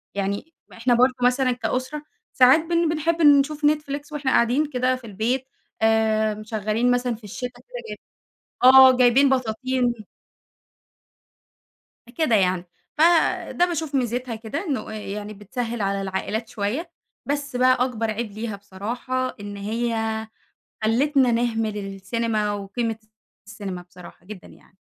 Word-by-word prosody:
يعني، 200 +11 -3 0.2
ما - - -15
إحنا 240 +2 +2
برضه 255 +2 +4
مثلًا 255 +1 +3
كأُسرة 255 +5 -3 0.3
ساعات 255 +4 +6
بن 335 0 0
بنحب 330 +1 0
نشوف 295 0 +4
Netflix 295 -1 0
وإحنا 285 -3 -1
قاعدين 250 +6 +3
كده 255 -1 +1
في 250 -3 -11
البيت 235 +6 -1 0.4
آآ، 220 -1 +2
مشغّلين 215 +3 -1
مثلًا 245 -1 0
في 220 - -18
الشتا 250 +5 -5
كده - - -24 0.2
جايب - - -6 0.7
آه 260 0 +9
جايبين 255 +3 +5
بطاطين 255 0 0 2.2
أ - - -14
كده 310 -9 +3
يعني، 185 -2 +1 0.3
ف - - +1 0.5
ده 355 - +2
باشوف 320 -4 -3
ميزِتها 245 -1 -1
كده 225 +7 -5
إنه 265 -10 -3
آآ - - -6
يعني 210 0 -6
بتسهّل 225 +3 -5
على 195 0 -1
العائلات 205 +4 -3
شوية، 245 - -3 0.3
بس 285 -2 -3
بقى 255 +1 +4
أكبر 225 -3 -2
عيب 220 0 -4
ليها 215 0 -5
بصراحة 240 +7 -4
إن 205 0 -7
هي 230 +3 -2 0.9
خلِّتنا 260 +3 +3
نهمل 225 -2 0
السينما 210 +2 -2
وقيمة 220 +3 -3
الت 215 - -34 0.4
السينما 200 -4 -7
بصراحة 175 0 -15
جدًا 210 -3 -10
يعني. 190 - -20
240 Hz, 140 wpm, -23 LUFS, 215-265 Hz, 2.2 s, آه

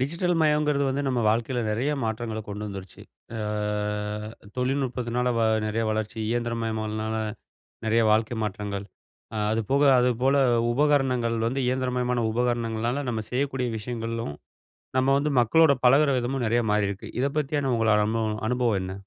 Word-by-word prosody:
Digital 170 +6 0
மயங்கிறது 150 -2 +2
வந்து 135 +2 -1
நம்ம 130 -2 +1
வாழ்க்கையில 115 +3 0
நிறைய 120 +7 0
மாற்றங்கள 110 0 -3
கொண்டு 105 +1 -5
வந்துருச்சு. 95 -3 -9 0.3
அ - - -3 1.2
தொழில்நுட்பத்தினால 125 -2 -1 0.4
நிறைய 110 +1 -1
வளர்ச்சி, 110 0 -3
இயந்திரமயமானனால 110 -2 -2 0.7
நிறைய 115 +1 +3
வாழ்க்கை 110 +2 +2
மாற்றங்கள். 100 -1 -4 0.5
அ - - -3 0.2
அதுபோக, 115 +6 +1 0.2
அதுபோல 125 +3 +2 0.4
உபகரணங்கள் 130 -4 +2
வந்து 130 +3 -1
இயந்திரமயமான 125 -1 0
உபகரணங்கள்னால 120 +2 -1
நம்ம 110 -2 -2
செய்யக்கூடிய 130 -1 -1
விஷயங்களும், 115 - -4 0.6
நம்ம 130 +1 +3
வந்து 150 +1 0
மக்களோட 150 +7 +5
பழகுற 140 +4 +6
விதமும் 125 +1 -2
நிறைய 120 +2 +2
மாறியிருக்கு. 100 -2 -1
இத - - +2
பத்தியான 145 -2 0
உங்களோட 110 -2 +3
அனுபவ 110 -1 -1
அனுபவம் 120 -5 +1
என்ன? 95 0 -5
120 Hz, 125 wpm, -26 LUFS, 110-135 Hz, 1.2 s, பழகுற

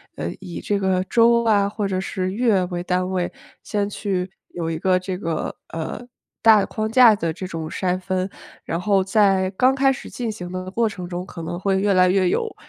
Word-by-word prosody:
呃， 85 - -3
以 180 -3 -7
这 205 -1 0
个 190 -1 +1
周 235 0 +4
啊 205 -3 +3
或 205 0 -3
者 185 -1 -1
是 185 -1 -3
月 215 -3 +2
为 175 -1 -4
单 180 +1 -1
位， 180 -2 -1 0.3
先 205 -1 -2
去 190 -3 -3 0.2
有 165 -2 -4
一 160 - -2
个 185 +1 +3
这 185 0 -4
个， 165 -4 -3 0.2
呃， 165 +5 -5 0.4
大 220 -2 +7
的 - - 0
框 215 0 -3
架 235 -1 +7
的 165 -5 -2
这 185 - -6
种 165 -3 -5
筛 185 +1 -1
分。 185 0 -2 0.3
然 165 - -3
后 195 +1 +2
在 195 -2 +3
刚 255 +7 +3
开 270 0 +4
始 265 - -6
进 235 -3 -3
行 180 -4 -7
的 185 0 -5
过 230 +3 +1
程 180 -5 -6
中 180 0 -4
可 175 - -9
能 175 +2 -4
会 195 0 +1
越 200 0 +2
来 185 0 +5
越 185 -1 +3
有 450 - -1
190 Hz, 230 characters per minute, -22 LUFS, 180-210 Hz, 0.4 s, 大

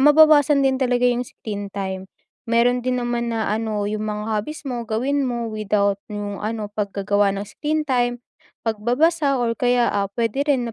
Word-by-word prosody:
mababawasan 295 -1 +6
din 265 0 +2
talaga 250 -1 +2
yung 245 0 +1
screen 205 -2 -6
time. 190 -1 -5 0.4
Meron 240 +2 +3
din 250 +1 -1
naman 240 -1 -1
na, 225 -2 -1
ano, 215 -1 -1
yung 210 +1 -2
mga 210 0 -3
hobbies 255 +10 -3
mo 245 -3 -3
gawin 270 +6 0
mo, 235 -1 -2
without 200 -2 0
yung 205 -1 -5
ano, 215 -1 -4
paggagawa 205 0 +1
ng 200 - -3
screen 305 +7 -2
time, 245 -3 +1 0.5
pagbabasa 275 +7 +2
or 240 -2 +1
kaya, 245 0 +2
ah, 200 -1 0
puwede 230 +4 -1
rin 245 -5 +1
235 Hz, 170 wpm, -22 LUFS, 210-255 Hz, 0.5 s, mababawasan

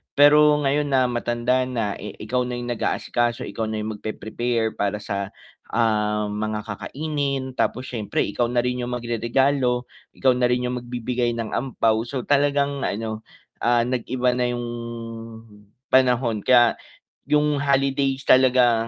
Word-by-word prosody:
pero 150 +1 +7
ngayon 145 +2 +1
na 130 -3 +2
matanda 120 +2 0
na, 115 -5 -2
eh, 105 - -7
ikaw 125 +3 -1
na 125 - -3
yung 120 0 -4
nag-aasikaso, 120 0 -1
ikaw 110 -1 -4
na 110 -1 -3
yung 105 -1 -5
magpe-prepare 110 +1 -2
para 100 0 0
sa, 100 0 -4 0.4
ah, 105 -2 +1
mga 105 0 -3
kakainin 140 +4 -3
tapos 130 0 -2
siyempre 110 -4 -1
ikaw 120 +3 0
na 120 0 +1
rin 125 0 -1
yung 125 0 -3
magreregalo, 125 +2 +1 0.3
ikaw 130 -1 +3
na 125 0 +2
rin 125 0 0
yung 125 - -2
magbibigay 120 0 -2
ng 115 -2 -4
ampao. 115 -3 0
So, 130 -1 -4
talagang 140 0 +1
ano, 110 +1 -4 0.3
ah, 120 0 +3
nag-iba 125 0 0
na 125 0 0
yung 120 0 -4 1.3
panahon, 125 -4 +2
kaya 120 -2 +5 0.5
yung 150 -1 +2
holidays 135 -1 +1
talaga, 125 -3 +4
125 Hz, 145 wpm, -23 LUFS, 115-130 Hz, 1.3 s, pero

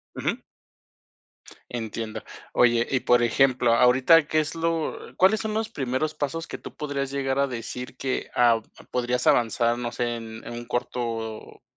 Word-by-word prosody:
Ujú. - - -1 1.3
Entiendo. 110 -1 -5 0.3
Oye, 120 -1 +4
y 130 - +1
por 120 -1 +4
ejemplo, 125 0 +3
ahorita, 130 +7 +5
¿qué 155 - +1
es 155 +1 0
lo 165 -1 -1 0.2
cuáles 195 +4 +4
son 215 -1 -3
los 220 0 -1
primeros 135 +3 -2
pasos 165 +3 -3
que - - -7
tú - - -10
podrías 140 -3 -3
llegar 135 -1 -1
a 140 - +3
decir 125 +1 -6
que, 130 -1 -2
ah, 120 -2 +4 0.3
podrías 125 0 -1
avanzar, 120 0 +3
no 120 -1 -3
sé, 120 -1 -2
en 110 -1 -9
en - - -7
un 120 0 -7
corto, 115 -2 -4
125 Hz, 160 wpm, -25 LUFS, 120-140 Hz, 1.3 s, ahorita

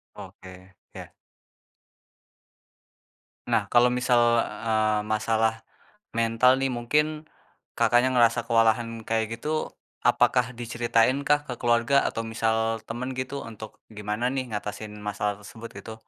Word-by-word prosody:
Oke, 95 +1 -12 0.2
ya. - - -9 2.4
Nah 105 -4 +1
kalau 125 0 +4
misal, 120 -2 +3
eee, 110 -1 0
masalah 110 +1 0 0.6
mental 115 +3 +4
nih 135 -1 -1
mungkin 150 +6 -1 0.4
Kakaknya 120 +2 +3
ngerasa 120 -1 +3
kewalahan 115 0 +1
kayak 115 0 -1
gitu, 155 +3 -2 0.3
apakah 125 0 +3
diceritain 120 +3 +1
kah 145 0 +1
ke 125 - -4
keluarga 120 +3 +2
atau - - -2
misal 110 0 -1
temen 125 +3 -5
gitu 130 +2 -4
untuk 110 -1 -10
gimana 105 +2 -3
nih 130 0 -1
ngatasin 105 +1 -5
masalah 105 0 -3
tersebut 115 +3 -11
gitu? 110 +2 -9
115 Hz, 115 wpm, -26 LUFS, 110-125 Hz, 2.4 s, kalau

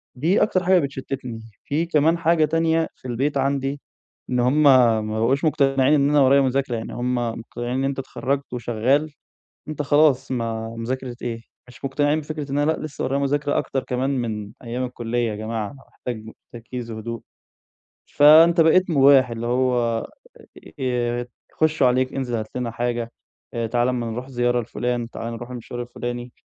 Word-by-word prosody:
دي 165 +10 +2
أكتر 185 -3 +1
حاجة 185 0 +4
بتشتتني. 130 -4 -5 0.2
في 155 +4 -1
كمان 160 +1 +2
حاجة 165 -1 +3
تانية 165 +1 +1
في 130 - -11
البيت 135 +4 -1
عندي، 135 +1 -1 0.5
إن 125 -1 0
هُم 135 +5 +3
ما 125 -5 +6 0.2
بقوش 135 +7 +1
مقتنعين 135 -2 +3
إن 140 -1 +3
أنا 145 -1 +4
ورايا 135 +1 +5
مذاكرة، 130 -1 0
يعني 110 - -5
هُم 125 +1 -1
مقتنعين 120 +1 -4
إن 135 - 0
أنت 135 0 -1
اتخرجت 135 +1 -3
وشغال، 125 +6 0 0.6
أنت 155 -1 -3
خلاص، 145 -2 +3
ما 115 -2 -2
مذاكرة 125 +1 -4
إيه؟ 115 -1 -4 0.3
مش 125 +2 -10
مقتنعين 145 +3 +1
بفكرة 150 -2 -6
إن 140 - -1
أنا 145 +2 +2
لأ، - - -2
لسه 155 -3 -6
ورايا 135 +2 0
مذاكرة 145 +1 0
أكتر 135 - -2
كمان 130 +2 -1
من 110 -6 -3
أيام 120 +2 -3
الكلية 120 -1 -2
يا 105 - -4
جماعة، 110 -1 -4
أنا 135 -1 -15
محتاج 110 -3 -7 0.3
تركيز 120 0 -7
وهدوء. 115 +1 -6 0.8
فأنت 165 +3 +6
بقيت 180 +3 +4
مباح، 135 -3 +6
اللي 115 0 -4
هو 120 -2 +1 0.8
ي 120 -1 -1 0.3
يخشوا 155 -4 +2
عليك، 130 +1 +1
انزل 125 -3 -2
هات 110 -1 -3
لنا 125 -2 -2
حاجة، 120 0 -2 0.4
آآ 115 -1 -2
تعالَ 120 +2 +1
أمّا 120 -2 -2
نروح 125 +3 -5
زيارة 120 -1 +1
لفلان، 120 0 -3
تعالَ 115 0 -6
نروح 120 +2 -8
المشوار 120 0 -6
الفلاني. 120 0 -6
130 Hz, 170 wpm, -22 LUFS, 120-145 Hz, 0.8 s, ما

